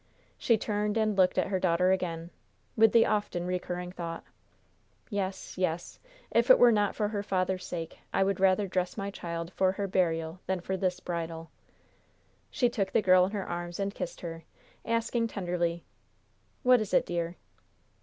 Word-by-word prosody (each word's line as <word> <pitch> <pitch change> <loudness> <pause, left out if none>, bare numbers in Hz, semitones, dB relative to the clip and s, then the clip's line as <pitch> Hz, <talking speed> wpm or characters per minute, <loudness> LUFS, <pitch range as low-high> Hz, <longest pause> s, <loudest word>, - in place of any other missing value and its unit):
She 230 - +3
turned 210 0 -1
and 215 -2 +1
looked 185 -1 +3
at - - +1
her 190 -1 0
daughter 180 0 +3
again, 170 -2 -2 0.4
with 225 -1 +6
the 230 - +6
often 205 -5 -1
recurring 180 0 -3
thought: 170 -2 -6 0.9
"Yes, 195 -2 -4
yes, 175 -2 -2 0.3
if - - +2
it - - +9
were 245 - +7
not 205 -2 +1
for 210 -2 0
her 205 -2 -2
father's 185 -1 -1
sake, 165 -2 -6
I - - +2
would 195 -1 0
rather 195 +1 +3
dress 185 +1 -2
my 200 -1 -3
child 170 -1 -5
for 185 -1 +2
her 200 +1 -2
burial 165 -2 0
than 190 -1 0
for 190 +2 -3
this 185 -1 -1
bridal." 165 -1 -5 1.0
She 250 - +2
took 200 -5 -1
the 215 - +3
girl 185 -1 +6
in 190 - -4
her 200 -2 -3
arms 175 +1 -5
and 200 0 -1
kissed 175 - -6
her, 165 -1 -6 0.4
asking 230 0 0
tenderly: 175 -4 -2 0.8
"What 250 -2 +6
is 215 - -1
it, - - +4
dear?" 170 0 -2
185 Hz, 175 wpm, -29 LUFS, 175-205 Hz, 1.0 s, it